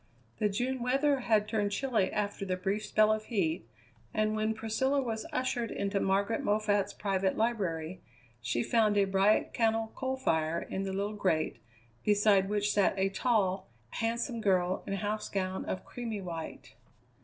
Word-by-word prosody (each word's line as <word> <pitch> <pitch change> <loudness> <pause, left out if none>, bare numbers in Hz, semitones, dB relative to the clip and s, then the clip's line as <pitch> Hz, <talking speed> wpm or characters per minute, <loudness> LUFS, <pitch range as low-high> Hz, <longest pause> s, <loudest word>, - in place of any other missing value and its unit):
The 210 -2 +2
June 250 +5 -1
weather 275 +3 +2
had 220 -4 +2
turned 210 -2 0
chilly 220 -4 +1
after 205 -1 -2
the 185 -2 -1
brief 200 +3 -1
spell 215 0 +4
of 215 0 -3
heat, 165 - -1 0.5
and 215 0 +1
when 215 +1 0
Priscilla 225 +6 0
was 230 0 -3
ushered 255 -5 -1
into 200 0 -1
Margaret 200 +7 +1
Moffatt's 205 -3 +1
private 195 -2 -1
library 185 -7 -1 0.4
she 120 0 0
found 215 -3 +3
a 200 - +5
bright 195 +2 +2
cannel 225 -1 +1
coal 260 0 -2
fire 160 -9 +1
in 195 +2 -4
the 195 - -2
little 200 +2 -2
grate, 185 -6 0 0.5
beside 205 -2 +4
which 205 0 +1
sat 200 -1 +2
a 195 0 +2
tall, 195 -3 +1 0.2
handsome 235 +1 -2
girl 185 -3 +2
in - - -2
house 210 +2 -2
gown 190 -1 -2
of 185 - -4
creamy 230 -4 -5
white. 165 -3 -7
210 Hz, 160 wpm, -31 LUFS, 190-225 Hz, 0.5 s, a